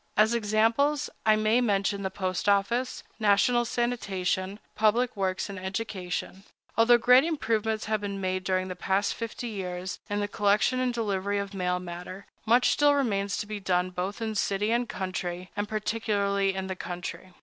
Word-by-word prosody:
As 215 +2 +5
examples, 230 +6 +2 0.2
I 215 - +7
may 215 +3 +3
mention 200 -3 +1
the 190 - -1
post 185 0 -2
office, 220 +6 +1 0.2
national 220 +3 +3
sanitation, 200 -6 -1 0.2
public 225 +3 +2
works, 190 -2 -1
and 200 -2 -7
education. 190 -1 -4 0.3
Although 235 +1 +6
great 250 +2 +6
improvements 225 -9 -1
have 215 0 0
been 200 -1 -4
made 185 -1 -1
during 185 0 0
the 185 - -5
past 190 +3 0
fifty 230 +1 -5
years 185 -3 -5
in 205 0 -1
the 205 - 0
collection 205 +5 +2
and 255 -1 +1
delivery 205 -4 -1
of 200 0 -3
mail 180 -2 0
matter, 180 +2 -8 0.2
much 245 +3 +5
still 290 0 +4
remains 200 -7 0
to - - -3
be 210 0 -5
done 180 -1 0
both 190 +5 -3
in 220 -1 -2
city 205 +1 0
and 240 0 +1
country, 185 -1 -4
and 205 0 -2
particularly 205 -3 0
in 190 0 -3
the 190 0 -4
country. 180 +1 -6
205 Hz, 170 wpm, -28 LUFS, 190-225 Hz, 0.3 s, I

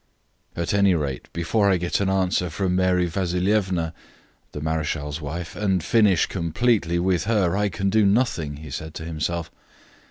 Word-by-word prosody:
"At 85 +2 -2
any 100 -2 +4
rate, 70 -5 -4
before 100 +5 +1
I 95 - +3
get 85 0 -1
an 100 -1 +1
answer 95 -2 +1
from 90 +2 -1
Mary 90 -1 +2
Vasilievna 90 -1 0 0.6
(the - - -6
marechal's 75 -1 -2
wife), 85 +4 -5
and 95 -5 0
finish 105 -5 +4
completely 85 +1 0
with 90 +1 +1
her, 100 -5 +2
I 105 0 +1
can 95 +2 -1
do 110 +1 +4
nothing," 100 - +1
he 75 -1 -10
said 80 +3 -6
to 80 - -6
himself. 85 +1 -3
90 Hz, 160 wpm, -23 LUFS, 80-100 Hz, 0.6 s, any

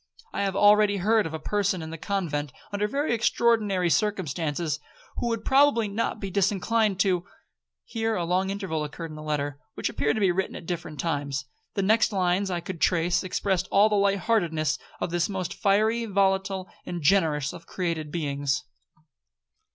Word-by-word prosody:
I - - -1
have 195 -1 -1
already 205 0 +5
heard 215 +1 +2
of 160 - -8
a - - -2
person 195 0 -1
in 160 - -7
the 165 - -6
convent 155 -8 -2 0.2
under 205 +1 0
very 280 +3 0
extraordinary 215 -6 +2
circumstances, 165 -6 -1 0.4
who - - -1
would 230 -2 -2
probably 270 -5 +4
not 220 +2 -2
be 195 -2 -5
disinclined 200 +1 +1
to' 185 -3 +2 0.6
'Here 225 -1 -2
a 175 - -1
long 185 +3 +1
interval 190 -6 -2
occurred 155 +2 -6
in - - -8
the 155 - -8
letter, 145 -2 -2 0.2
which - - -1
appeared 145 - 0
to - - -1
be 195 -3 +3
written 190 +2 -2
at - - -8
different 165 -4 -5
times. 145 -3 -2 0.3
The 195 - 0
next 220 +2 +3
lines 185 0 +1
that 185 - -1
I 175 - -3
could 175 -1 -7
trace, 175 0 +2
expressed 190 0 -1
all 205 +2 +5
the 210 - +1
light 200 0 +3
heartedness 160 -8 +1 0.2
of - - -2
this 175 +2 0
most 185 -3 -3
fiery, 220 +4 +2
volatile, 195 -1 +1 0.2
and 175 -3 -5
generous 150 -5 +2
of 170 - -11
created 165 -4 -3
beings. 145 -4 -1
190 Hz, 180 wpm, -26 LUFS, 165-205 Hz, 0.6 s, already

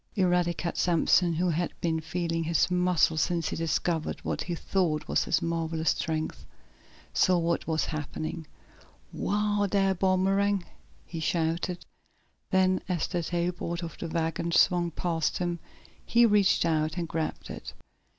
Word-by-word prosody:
Eradicate 175 -3 +1
Sampson, 175 0 +3
who 175 +2 +1
had 170 +2 -1
been 165 -1 0
feeling 165 +1 -2
his 165 +2 +2
muscle 180 -3 +3
since 165 0 0
he - - -3
discovered 165 0 -1
what - - -3
he 175 - -3
thought 160 -4 -1
was - - +1
his 170 - +1
marvelous 165 -1 0
strength, 155 -1 -3 0.7
saw 185 -1 +4
what 170 0 0
was 160 -1 +1
happening. 155 +1 -5 0.6
"Whoa, 205 0 0
dar, 195 -1 +2
Boomerang!" 190 +1 +2 0.4
he 165 - -6
shouted. 170 +2 -1 0.6
Then, 185 0 +3
as 175 -4 0
the 175 -2 -2
tailboard 170 0 -2
of 165 -2 -6
the 170 - -4
wagon 165 +1 -1
swung 175 0 +4
past 165 -1 -1
him, 175 -1 -2 0.4
he 235 0 +4
reached 205 -5 +4
out 155 0 0
and 170 -1 -2
grabbed 160 -1 -4
it. - - -8
170 Hz, 140 wpm, -28 LUFS, 160-180 Hz, 0.7 s, saw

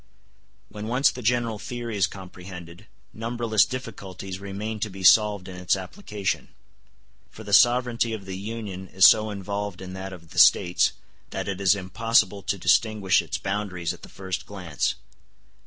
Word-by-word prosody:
When 105 +1 -7
once 125 +4 +3
the 125 - -8
general 115 -2 0
theory 120 -1 -5
is 100 -2 +3
comprehended, 90 0 -11 0.3
numberless 115 -1 +1
difficulties 95 -7 -7
remain 100 +3 -5
to 110 - -2
be 95 -1 -9
solved 105 -1 +5
in 90 -1 -8
its 90 +1 +1
application; 100 - -4 0.8
for 110 - -12
the 105 -1 -6
sovereignty 120 +1 +4
of 110 -3 -5
the 95 -1 -6
Union 100 -2 -6
is 95 +2 +5
so 110 0 +6
involved 100 -1 -4
in 95 -1 -8
that 95 0 -6
of 85 -3 -12
the 90 - -1
States 90 +1 +5 0.4
that 95 - -4
it 100 -1 -3
is 100 +1 +5
impossible 100 +1 +1
to 100 +1 -2
distinguish 100 +1 +3
its 80 -3 -4
boundaries 95 -4 -3
at - - -14
the - - -12
first 95 -1 -5
glance. 90 -8 -2
100 Hz, 160 wpm, -25 LUFS, 95-110 Hz, 0.8 s, so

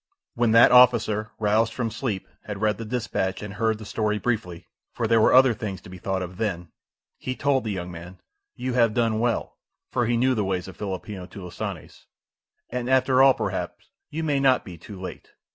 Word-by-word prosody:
When 120 -1 +1
that 115 +1 +7
officer, 115 -4 +5
roused 110 +2 +2
from 115 -3 -2
sleep, 110 -4 -3 0.2
had 105 -2 -5
read 105 -1 0
the 115 - -5
dispatch 105 -5 -2
and 105 -1 -6
heard 110 0 0
the 110 - -10
story 105 0 -1
briefly, 105 -7 -3 0.2
for 115 - -2
there 115 0 +4
were - - +5
other 130 -1 +6
things 105 -5 -5
to 90 - -13
be 95 - -10
thought 95 0 -2
of 90 0 -8
then, 90 -7 -3 0.5
he 130 - -4
told 140 -2 +1
the 110 - -3
young 90 -2 -4
man, 85 +2 -10 0.4
"You 130 0 -3
have 115 -3 +3
done 115 -2 +1
well," 120 0 -1 0.3
for 120 -2 0
he 120 0 +1
knew 130 +2 +3
the 110 -4 0
ways 95 -2 -2
of 95 - -10
Filipino 95 -1 -6
"tulisanes," 90 -2 -8 0.6
"and 125 0 -3
after 130 0 +4
all 135 -1 +7
perhaps - - -4 0.2
you 160 +2 -4
may 145 -3 +1
not 135 -2 +3
be 90 -4 -8
too 95 +4 -11
late." 90 -1 -9
110 Hz, 200 wpm, -25 LUFS, 95-120 Hz, 0.6 s, that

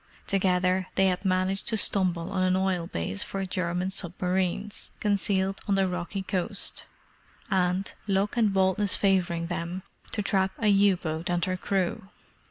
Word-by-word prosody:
Together 185 -1 +1
they 195 - +4
had 180 +1 -2
managed 190 0 0
to 225 - +2
stumble 185 -3 +2
on 190 -2 -1
an 185 0 +3
oil 185 -3 0
base 85 - -1
for 195 -1 -4
German 180 0 -2
submarines, 185 +2 -2
concealed 195 -2 0
on 200 - +2
the 195 -1 +2
rocky 180 +2 -4
coast; 195 +2 -1 0.7
and, 185 0 +1
luck 200 +2 +1
and 225 -4 +3
boldness 190 +1 +2
favouring 180 -4 +1
them, 175 +2 -4 0.3
to 210 - -1
trap 190 -1 +1
a 215 - +2
U 200 -1 +4
boat 160 +1 -4
and 175 -1 +1
her 185 - -1
crew. 190 +2 -2
190 Hz, 155 wpm, -27 LUFS, 180-195 Hz, 0.7 s, they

